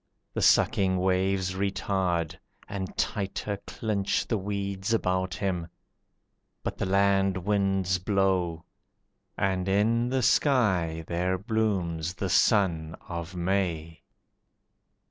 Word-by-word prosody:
The - - -2
sucking 95 -2 +4
waves 95 0 +1
retard, 95 -4 -1 0.3
and 95 -2 -5
tighter 100 0 -2
clinch 105 -3 -1
The 115 - -1
weeds 100 +2 -2
about 95 -2 0
him, 95 -5 -2 1.0
but - - -3
the 100 - -1
land 95 0 +3
winds 95 -1 +1
blow, 90 -4 0 0.7
And 95 -1 0
in 115 +5 +2
the 130 0 0
sky 95 - +2
there 90 +3 0
blooms 90 -5 -1
the 95 +2 -3
sun 85 -7 +2
of 85 0 -6
May. 85 -3 -1
95 Hz, 105 wpm, -27 LUFS, 90-100 Hz, 1.0 s, sucking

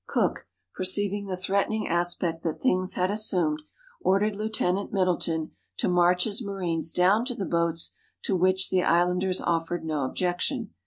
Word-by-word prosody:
Cook, - - 0 0.3
perceiving 200 +2 0
the 185 -1 -3
threatening 200 +3 0
aspect 175 -1 -1
that 165 -2 -3
things 185 -6 +1
had 185 +1 +1
assumed, 180 -8 +1 0.4
ordered 200 +2 +2
Lieutenant 200 -2 -1
Middleton 175 -4 0 0.3
to - - 0
march 180 0 +3
his 215 +2 0
marines 175 -5 -2
down 195 +5 +3
to 250 -1 -3
the 195 - -3
boats, 170 -1 0 0.3
to 195 - +1
which 185 +1 +2
the 185 - +3
islanders 180 +2 +2
offered 165 0 -1
no 155 -3 -1
objection. 185 - -2
185 Hz, 150 wpm, -26 LUFS, 175-200 Hz, 0.4 s, march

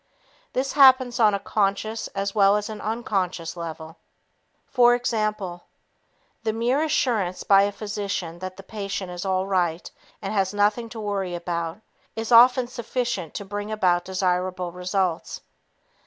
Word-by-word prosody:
This 265 +2 -1
happens 260 -3 +6
on 210 -3 +5
a - - -2
conscious 210 +2 -1
as 195 0 -2
well 200 -1 +5
as 210 +1 -4
unconscious 200 -6 -3
level. 165 -1 -7 0.7
For 245 -1 +4
example, 215 -7 -2 0.8
the 225 -1 0
mere 240 +6 +1
assurance 230 - 0
by 195 -1 +6
a 200 +1 +1
physician 200 -4 -4
that 185 0 -7
the 195 - -10
patient 195 -2 -5
is 180 +2 -6
all 190 0 0
right 180 -3 -1 0.3
and 195 - -4
has 195 -1 0
nothing 210 +3 +1
to 225 - -8
worry 200 -4 -2
about 170 +2 -4 0.3
is 225 +1 -4
often 250 +2 +7
sufficient 240 - -3
to 200 - -5
bring 205 +2 -5
about 180 -5 +2
desirable 185 -1 -1
results. 180 -1 -2
200 Hz, 140 wpm, -24 LUFS, 180-225 Hz, 0.8 s, often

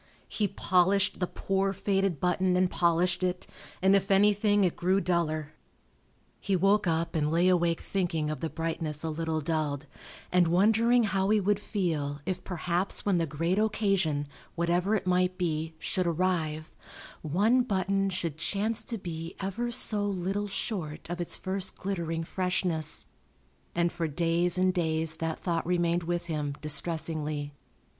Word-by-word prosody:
He 210 - 0
polished 190 +2 +2
the 180 - 0
poor 195 +1 -1
faded 195 -4 0
button 180 0 +1
and 185 0 +2
polished 175 +1 +2
it, 180 -1 -1 0.4
and 190 +1 +6
if 195 0 +1
anything 205 +1 +4
it 180 - +1
grew 185 +3 +2
duller. 155 -5 -1 0.9
He 195 - 0
woke 195 +2 +3
up 165 0 0
and 150 -2 +1
lay 170 +2 +3
awake 170 -2 +2
thinking 165 -5 -1
of 155 - -4
the 165 - -3
brightness 160 -2 -3
a 160 - -2
little 160 0 -2
dulled 150 -2 -1 0.5
and 180 -1 +4
wondering 225 +7 +4
how 195 -2 0
he 215 0 +4
would 205 +1 +1
feel 160 -9 -2
if 185 -1 -3
perhaps 180 +1 -2
when 195 -4 +2
the 165 - 0
great 165 +7 0
occasion 195 -9 +1 0.3
(whatever 175 +4 +1
it 195 -2 -2
might 180 0 +1
be) 160 -2 -2
should 180 +2 -1
arrive, 160 -3 -1 0.5
one 205 - +3
button 195 -3 0
should 170 -4 -3
chance 210 +6 -1
to 230 - -4
be 165 -3 -6
ever 200 +5 -2
so 210 -3 +2
little 195 +1 -2
short 185 -6 -4
of 175 0 -3
its 175 - -2
first 190 0 -2
glittering 170 -4 -3
freshness, 180 -3 0 0.7
and 170 0 +2
for 170 -1 -2
days 170 +3 +1
and 185 0 +3
days 160 -2 0
that 165 -1 -2
thought 170 -2 -2
remained 175 -1 +1
with 175 +1 -2
him, 150 -4 -3
distressingly. 155 -1 -1
175 Hz, 155 wpm, -29 LUFS, 160-195 Hz, 0.9 s, and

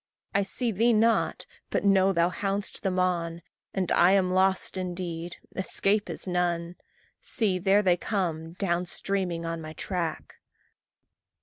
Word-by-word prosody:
I 200 - +3
see 230 +4 -1
thee 230 +4 +3
not, 225 +1 +2 0.2
but - - -1
know 195 -1 +4
thou 170 -1 +2
hound'st 200 +1 -2
them 190 -2 -1
on, 170 -2 -1 0.3
And 190 -3 -1
I 180 +2 +5
am 185 -2 +2
lost 190 +1 +2
indeed 175 -2 -4 0.2
escape 200 +2 +1
is - - -4
none. 175 -1 -1 0.4
See! 195 -5 +2
there 195 +3 +3
they 180 -2 +3
come, 165 -6 -2
down 180 -1 -1
streaming 180 -3 -1
on 165 0 -3
my 155 0 -8
track! 170 -2 -4
185 Hz, 140 wpm, -27 LUFS, 170-195 Hz, 0.4 s, I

